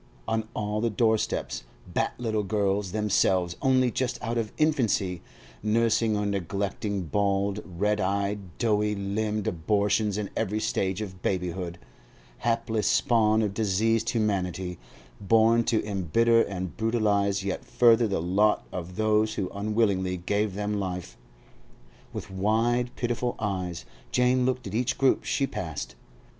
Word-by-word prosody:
On 110 Hz, -1 st, -1 dB
all 105 Hz, 0 st, -1 dB
the 115 Hz, -, +1 dB
doorsteps 110 Hz, -, 0 dB, 0.3 s
sat -, -, 0 dB
little 110 Hz, -3 st, 0 dB
girls, 100 Hz, -1 st, 0 dB
themselves 95 Hz, -4 st, +1 dB
only 130 Hz, -2 st, +3 dB
just 125 Hz, 0 st, -1 dB
out 115 Hz, 0 st, -2 dB
of 115 Hz, -2 st, -1 dB
infancy, 115 Hz, -, +1 dB, 0.4 s
nursing 110 Hz, 0 st, +2 dB
or 105 Hz, -, -1 dB
neglecting 100 Hz, +1 st, -2 dB
bald, 100 Hz, +3 st, 0 dB
red 105 Hz, +4 st, -1 dB
eyed, 100 Hz, +2 st, 0 dB, 0.2 s
doughy 105 Hz, -2 st, +1 dB
limbed 105 Hz, +1 st, -2 dB
abortions 105 Hz, +4 st, +1 dB
in 105 Hz, -2 st, -3 dB
every 110 Hz, -1 st, -1 dB
stage 95 Hz, -1 st, -1 dB
of 95 Hz, -3 st, -9 dB
babyhood, 90 Hz, -2 st, -2 dB, 0.6 s
hapless 115 Hz, -2 st, 0 dB
spawn 110 Hz, -3 st, +3 dB
of 105 Hz, -2 st, -1 dB
diseased 110 Hz, +2 st, +1 dB
humanity, 95 Hz, -6 st, -1 dB, 0.4 s
born 115 Hz, +3 st, +4 dB
to 115 Hz, -3 st, +1 dB
embitter 105 Hz, +4 st, +3 dB
and 95 Hz, -4 st, -4 dB
brutalise 105 Hz, -3 st, +1 dB
yet 95 Hz, -1 st, -3 dB
further 115 Hz, -1 st, +4 dB
the 100 Hz, -, -1 dB
lot 100 Hz, +5 st, +2 dB
of 90 Hz, 0 st, -6 dB
those 110 Hz, +1 st, +2 dB
who 95 Hz, -3 st, -2 dB
unwillingly 100 Hz, -3 st, 0 dB
gave 100 Hz, +3 st, -1 dB
them 105 Hz, 0 st, -1 dB
life. 90 Hz, -9 st, -4 dB, 1.0 s
With -, -, -7 dB
wide, 115 Hz, +5 st, +1 dB
pitiful 120 Hz, 0 st, -1 dB
eyes 95 Hz, -5 st, -3 dB, 0.3 s
Jane 125 Hz, 0 st, +3 dB
looked 130 Hz, -1 st, -1 dB
at -, -, -6 dB
each 120 Hz, +3 st, 0 dB
group 135 Hz, -1 st, +2 dB
she 140 Hz, -, +1 dB
passed. 80 Hz, -, -5 dB
105 Hz, 135 wpm, -27 LUFS, 95-115 Hz, 1.0 s, born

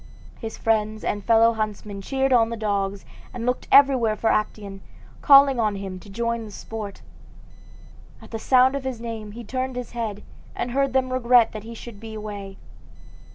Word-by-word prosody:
His 225 Hz, -2 st, -6 dB
friends 215 Hz, -1 st, 0 dB
and 205 Hz, -1 st, -2 dB
fellow 230 Hz, +1 st, +5 dB
huntsmen 210 Hz, -2 st, -4 dB
cheered 270 Hz, +5 st, 0 dB
on 230 Hz, -2 st, +4 dB
the 230 Hz, -, -4 dB
dogs, 200 Hz, -2 st, -2 dB, 0.3 s
and 235 Hz, -1 st, -4 dB
looked 250 Hz, 0 st, -1 dB
everywhere 260 Hz, -6 st, +5 dB
for 225 Hz, -, +1 dB
Actaeon, 205 Hz, -2 st, -2 dB, 0.4 s
calling 275 Hz, -3 st, +7 dB
on 215 Hz, -3 st, +1 dB
him 195 Hz, -2 st, -6 dB
to 200 Hz, -, -15 dB
join 235 Hz, +2 st, -2 dB
the 215 Hz, -, -9 dB
sport. 210 Hz, 0 st, -8 dB, 1.2 s
At -, -, -15 dB
the 225 Hz, -, -4 dB
sound 260 Hz, +3 st, +4 dB
of 280 Hz, -, -3 dB
his 260 Hz, -3 st, -4 dB
name 225 Hz, -3 st, -6 dB
he 235 Hz, +2 st, -8 dB
turned 255 Hz, +3 st, -3 dB
his 250 Hz, -1 st, -6 dB
head, 220 Hz, -3 st, -4 dB, 0.3 s
and 240 Hz, -, -3 dB
heard 275 Hz, 0 st, 0 dB
them 260 Hz, -1 st, +1 dB
regret 245 Hz, -2 st, +4 dB
that 215 Hz, -1 st, -8 dB
he 230 Hz, 0 st, -8 dB
should 230 Hz, -2 st, -10 dB
be 220 Hz, 0 st, -9 dB
away. 205 Hz, -2 st, -7 dB
225 Hz, 180 wpm, -24 LUFS, 210-250 Hz, 1.2 s, calling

